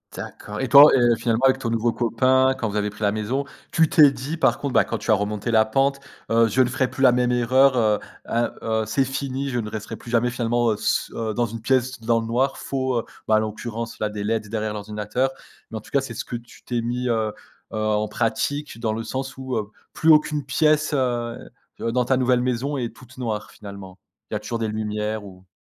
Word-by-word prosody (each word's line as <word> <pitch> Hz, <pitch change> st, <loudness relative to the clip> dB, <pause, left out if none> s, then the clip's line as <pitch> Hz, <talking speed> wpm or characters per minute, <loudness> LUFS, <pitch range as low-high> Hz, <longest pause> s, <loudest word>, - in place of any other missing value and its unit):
D'accord, 105 Hz, 0 st, -7 dB
et 130 Hz, -, -2 dB
toi, 145 Hz, +3 st, +10 dB
et 120 Hz, -2 st, +4 dB
finalement 115 Hz, +1 st, 0 dB
avec 130 Hz, 0 st, +4 dB
ton 120 Hz, -, -2 dB
nouveau 115 Hz, +1 st, +1 dB
copain, 130 Hz, +3 st, +2 dB
quand 110 Hz, -, -2 dB
vous 105 Hz, -, -3 dB
avez 105 Hz, 0 st, 0 dB
pris 105 Hz, +1 st, -8 dB
la 100 Hz, -, +3 dB
maison, 110 Hz, +6 st, -2 dB, 0.3 s
tu 160 Hz, -2 st, +3 dB
t'es 150 Hz, -3 st, +7 dB
dit 140 Hz, +5 st, -5 dB
par -, -, +3 dB
contre, 140 Hz, -3 st, -4 dB
bah, -, -, +4 dB
quand 115 Hz, -, -3 dB
tu 105 Hz, -, -1 dB
as -, -, +7 dB
remonté 105 Hz, +2 st, -1 dB
la 110 Hz, -1 st, +5 dB
pente, 135 Hz, +5 st, +1 dB, 0.3 s
heu: 115 Hz, 0 st, +5 dB
«Je 120 Hz, +4 st, +2 dB
ne 125 Hz, -, +3 dB
ferai 130 Hz, 0 st, 0 dB
plus 135 Hz, -, -3 dB
la 130 Hz, -, +8 dB
même 125 Hz, 0 st, +1 dB
erreur, 130 Hz, +3 st, +4 dB
heu, 110 Hz, -3 st, +3 dB, 0.3 s
ah, 120 Hz, +1 st, -1 dB
heu, 110 Hz, -1 st, 0 dB
c'est 135 Hz, +5 st, +1 dB
fini, 135 Hz, +1 st, -3 dB
je 120 Hz, -2 st, -1 dB
ne 105 Hz, -2 st, -4 dB
resterai 110 Hz, -1 st, -6 dB
plus -, -, -12 dB
jamais 120 Hz, +1 st, +2 dB
finalement, 120 Hz, -1 st, +1 dB
heu, -, -, 0 dB
s -, -, -1 dB
heu, 110 Hz, -2 st, -3 dB
dans 120 Hz, -, +1 dB
une 115 Hz, 0 st, -6 dB
pièce 130 Hz, +1 st, 0 dB
dans 115 Hz, 0 st, +1 dB
le -, -, -5 dB
noir, 130 Hz, +4 st, 0 dB
faut, 130 Hz, -3 st, -1 dB
heu» -, -, -4 dB, 0.2 s
bah, 110 Hz, -, +4 dB
en -, -, +5 dB
l'occurrence, 110 Hz, +2 st, -5 dB
là, 105 Hz, -, 0 dB
des 105 Hz, -1 st, -5 dB
LEDs 110 Hz, 0 st, -1 dB
derrière 110 Hz, 0 st, -2 dB
l'ordinateur, 105 Hz, +5 st, -2 dB, 0.4 s
mais 110 Hz, -, -4 dB
en -, -, -6 dB
tout -, -, -17 dB
cas, 140 Hz, -, +3 dB
c'est 130 Hz, -3 st, -6 dB
ce -, -, -4 dB
que 120 Hz, -, -5 dB
tu 120 Hz, 0 st, -16 dB
t'es 120 Hz, -1 st, -2 dB
mis, 125 Hz, +2 st, -2 dB
heu, 110 Hz, -2 st, 0 dB, 0.4 s
heu, -, -, -3 dB
en 110 Hz, 0 st, 0 dB
pratique 120 Hz, +4 st, -2 dB
dans 110 Hz, -2 st, -1 dB
le 115 Hz, -, -3 dB
sens 130 Hz, +2 st, -4 dB
où, 130 Hz, -2 st, -4 dB
heu, 105 Hz, -1 st, -3 dB, 0.2 s
plus 160 Hz, -, +1 dB
aucune 150 Hz, -2 st, +4 dB
pièce, 155 Hz, +2 st, +2 dB
heu, 120 Hz, -3 st, -1 dB, 0.4 s
heu, 115 Hz, -, -1 dB
dans 125 Hz, +1 st, +1 dB
ta 130 Hz, -, +2 dB
nouvelle 125 Hz, -1 st, +2 dB
maison 130 Hz, +3 st, -1 dB
est 120 Hz, -3 st, -4 dB
toute 130 Hz, 0 st, -16 dB
noire 110 Hz, -4 st, -4 dB
finalement? 100 Hz, -2 st, -11 dB, 0.3 s
Il -, -, -1 dB
y -, -, +1 dB
a -, -, -6 dB
toujours 115 Hz, +2 st, -4 dB
des 110 Hz, -1 st, -1 dB
lumières 105 Hz, 0 st, -3 dB
ou? 95 Hz, -1 st, -14 dB
120 Hz, 245 wpm, -23 LUFS, 110-130 Hz, 0.4 s, toi